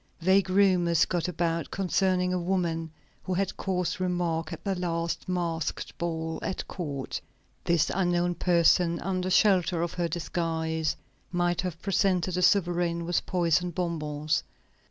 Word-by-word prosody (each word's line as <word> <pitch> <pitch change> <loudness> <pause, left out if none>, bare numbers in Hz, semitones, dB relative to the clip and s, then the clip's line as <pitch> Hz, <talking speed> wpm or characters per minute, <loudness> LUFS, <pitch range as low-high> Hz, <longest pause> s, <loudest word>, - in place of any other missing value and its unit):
Vague 190 +2 +3
rumors 180 -4 +4
got 175 0 -1
about 170 -2 -1
concerning 185 -1 +1
a 180 - 0
woman 170 -3 -1 0.3
who 185 - -3
had 195 +1 -1
caused 180 -2 -2
remark 170 -3 -1
at - - -7
the 195 - 0
last 170 -1 -2
masked 170 -3 -2
ball 160 -1 -2
at 190 - -4
court. 145 -7 -4 0.4
This 170 -2 +2
unknown 175 -1 +1
person, 170 0 +3
under 185 0 -1
shelter 185 -3 +3
of 170 - -3
her 175 -1 -1
disguise, 160 -1 -1 0.4
might 175 -1 +1
have 180 -3 -4
presented 185 -2 +1
the 180 - 0
sovereign 175 -2 +2
with 175 +1 0
poisoned 175 -1 +1
bonbons. 155 -4 -1
175 Hz, 135 wpm, -28 LUFS, 165-185 Hz, 0.4 s, rumors